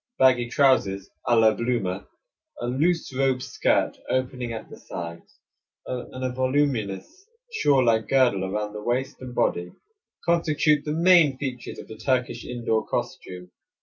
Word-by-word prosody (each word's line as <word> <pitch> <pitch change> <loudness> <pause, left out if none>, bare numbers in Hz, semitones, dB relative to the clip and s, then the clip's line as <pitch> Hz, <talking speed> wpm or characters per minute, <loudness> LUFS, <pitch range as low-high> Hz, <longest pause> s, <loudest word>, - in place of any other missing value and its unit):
Baggy 125 -2 +4
trousers 120 -8 +2 0.2
a 120 - +4
la 110 -1 +5
Bloomer, 105 -5 -2 0.5
a - - -3
loose 145 +4 0
robe 135 -1 +2
skirt - - 0
opening 125 -2 -1
at 110 -1 -6
the - - -12
sides, 85 -1 -8 0.5
and 130 +1 -6
a 130 - -1
voluminous 130 - -1 0.2
shawl 140 - +3
like 110 -1 +2
girdle 125 -8 +3
around 105 +2 -3
the 105 - -6
waist 130 +5 -1
and 125 -1 -8
body, 90 0 0 0.5
constitute 155 -3 +2
the 150 - -2
main 165 -4 +5
features 130 -3 -5
of - - -10
the 110 - -10
Turkish 120 0 -1
indoor 115 -3 -1
costume. 90 -1 -5
125 Hz, 145 wpm, -25 LUFS, 110-135 Hz, 0.5 s, la